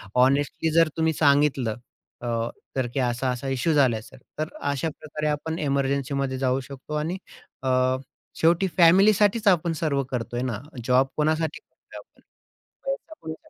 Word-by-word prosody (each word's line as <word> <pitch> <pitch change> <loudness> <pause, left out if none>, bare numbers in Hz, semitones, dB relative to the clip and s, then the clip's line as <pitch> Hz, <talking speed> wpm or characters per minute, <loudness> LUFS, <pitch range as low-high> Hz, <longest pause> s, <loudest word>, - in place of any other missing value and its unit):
Honestly 140 +5 +2
जर 165 0 +5
तुम्ही 160 0 +2
सांगितलं 140 -6 +2 0.5
अ, 120 - -5 0.5
तर 130 -2 0
की 135 - -1
असा-असा 125 +1 -1
इश्यू 135 +5 +1
झालाय, 125 -7 +3
सर. 130 - -15 0.2
तर 155 - -1 0.2
अशाप्रकारे 155 +1 -4
आपण 160 +2 -2
एमर्जन्सीमध्ये 140 -1 -1
जाऊ 130 0 +1
शकतो 140 +2 -9
आणि 160 +5 -2 0.5
अ, 130 - 0 0.7
शेवटी 170 +4 +3
फॅमिलीसाठीच 205 +5 +5
आपण 170 -3 +3
सर्व 140 -4 +1
करतोय 120 0 -3
ना. 120 -5 -2 0.3
जॉब 130 +1 +4
कोणासाठी 155 0 0
करतोय - - -16
आपण? - - -20 0.6
त्याच्यामुळे 325 - -5
145 Hz, 135 wpm, -25 LUFS, 130-160 Hz, 0.7 s, जर